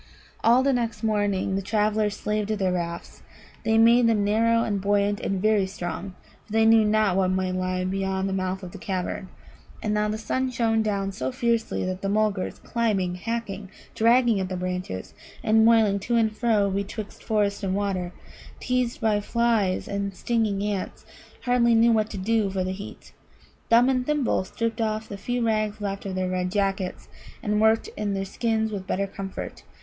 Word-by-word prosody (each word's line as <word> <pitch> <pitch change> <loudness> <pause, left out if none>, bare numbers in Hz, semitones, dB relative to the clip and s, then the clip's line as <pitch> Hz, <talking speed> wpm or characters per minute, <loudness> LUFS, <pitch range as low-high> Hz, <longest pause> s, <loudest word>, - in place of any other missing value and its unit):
All 240 +3 +5
the 275 0 +3
next 230 -3 -2
morning 205 -3 0
the 195 - 0
travellers 210 0 0
slaved 210 0 -2
at 215 - 0
their 190 -2 +1
rafts. 170 -1 -4 0.4
They 220 0 +2
made 230 +1 +6
them 220 -3 +2
narrow 230 +3 +3
and 205 -3 -1
buoyant 205 +1 +1
and 195 -1 -2
very 210 -1 +2
strong, 185 0 -5 0.3
for 215 - -12
they 225 0 +4
knew 225 0 +6
not 210 -3 +2
what 190 -1 +3
might 185 0 0
lie 185 0 -1
beyond 190 0 -1
the 195 - -2
mouth 190 0 -2
of 180 - -7
the - - -10
cavern. 185 0 -3 0.5
And 210 - -1
now 210 0 +1
the 215 - -2
sun 260 +4 -1
shone 230 -2 +1
down 200 -2 -1
so 130 -8 -3
fiercely 230 - 0
that 185 0 -3
the 195 - -1
Mulgars, 210 -2 0
climbing, 210 -7 0
hacking, 205 0 -4 0.2
dragging 235 -1 +4
at 185 -1 -2
the 185 - -3
branches, 180 - -4 0.3
and 220 0 +4
moiling 220 -3 +4
to 235 +5 -1
and 220 -2 +2
fro 215 -5 +2
betwixt 200 +2 -5
forest 205 -2 0
and 190 -2 -1
water, 190 -3 -1 0.5
teased 250 +2 -1
by 215 -2 +2
flies 225 -4 +1
and 200 -1 -3
stinging 215 -1 0
ants, 205 -2 -3 0.4
hardly 240 -2 +3
knew 230 +1 +5
what 215 -1 +2
to 210 - -6
do 215 +1 +1
for 190 -1 -1
the 185 - -2
heat. 200 +2 -9 0.6
Thumb 235 +2 +6
and 255 -1 +2
Thimble 280 -8 0
stripped 230 +3 -3
off 220 0 -1
the 200 - -6
few 240 +4 -2
rags 215 -1 0
left 200 -1 -4
of 190 - -4
their 185 0 -1
red 180 0 -1
jackets, 195 -2 -1 0.4
and 210 0 +1
worked 220 0 +3
in 205 -2 -2
their 195 0 -2
skins 220 +2 -1
with 190 -2 -5
better 200 +1 0
comfort. 195 0 -7
210 Hz, 185 wpm, -25 LUFS, 190-225 Hz, 0.6 s, made